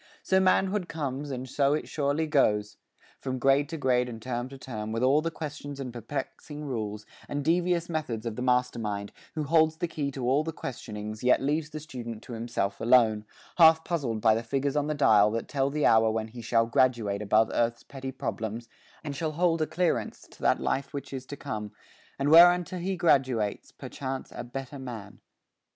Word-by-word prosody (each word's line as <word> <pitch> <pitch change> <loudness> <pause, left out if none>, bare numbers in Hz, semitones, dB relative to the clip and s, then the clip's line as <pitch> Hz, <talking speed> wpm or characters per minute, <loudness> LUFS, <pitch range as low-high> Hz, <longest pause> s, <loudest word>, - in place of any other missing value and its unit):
So 190 - +3
manhood 190 0 +2
comes 145 -2 -4
and 130 -1 -5
so 140 +2 +2
it 155 - -4
surely 145 +2 0
goes, 105 -9 +2 0.4
From 130 -1 -3
grade 135 +3 +3
to 165 - -4
grade 125 -3 +1
and 115 -2 -7
term 120 +1 -4
to 135 - -10
term, 110 -5 -6
With 115 +2 -1
all 140 +4 +4
the 165 - -1
questions 145 -3 -7
and 125 -3 -5
perplexing 145 +5 -6
rules, 105 -5 -4 0.2
And 145 -1 -3
devious 175 +1 +2
methods 150 -9 -3
of 115 -2 -3
the 125 - -5
Master 125 -1 +1
mind, 100 -2 -3 0.2
Who 155 - -1
holds 160 +1 +3
the 175 0 -1
key 150 -4 -3
to 130 -2 -3
all 140 +4 +3
the 160 - -3
questionings, 110 -5 -6
Yet 125 - +5
leaves 150 +3 -1
the 155 0 -6
student 120 -6 -7
to 120 - -9
himself 110 -4 -3
alone, 110 -3 +4 0.3
Half 160 -1 +7
puzzled 130 -11 -2
by 110 -1 +5
the 115 - 0
figures 135 +4 -1
on 145 0 +1
the 155 - -1
dial 105 -7 +5
That 115 +1 -3
tell 135 -1 0
the 150 +1 0
hour 110 0 +5
when 110 0 -2
he 120 +2 -9
shall 115 0 +2
graduate 115 -4 +1
Above 110 +2 +3
earth's 115 0 0
petty 135 -1 -7
problems, 115 -3 -4 0.4
and 145 -2 -5
shall 155 +2 -2
hold 165 0 +1
A 155 - +1
clearance 175 -1 -1
to - - -17
that - - +3
life 140 +1 -2
which 140 - -6
is 130 -1 -6
to 145 - -7
come, 105 -7 -5 0.4
And 140 +1 0
whereunto 175 +2 +6
he 190 +2 -2
graduates, 130 -11 +1
perchance, 135 -1 -6
A - - -6
better 135 +3 -7
man. 115 -6 -8
130 Hz, 200 wpm, -28 LUFS, 115-150 Hz, 0.4 s, Half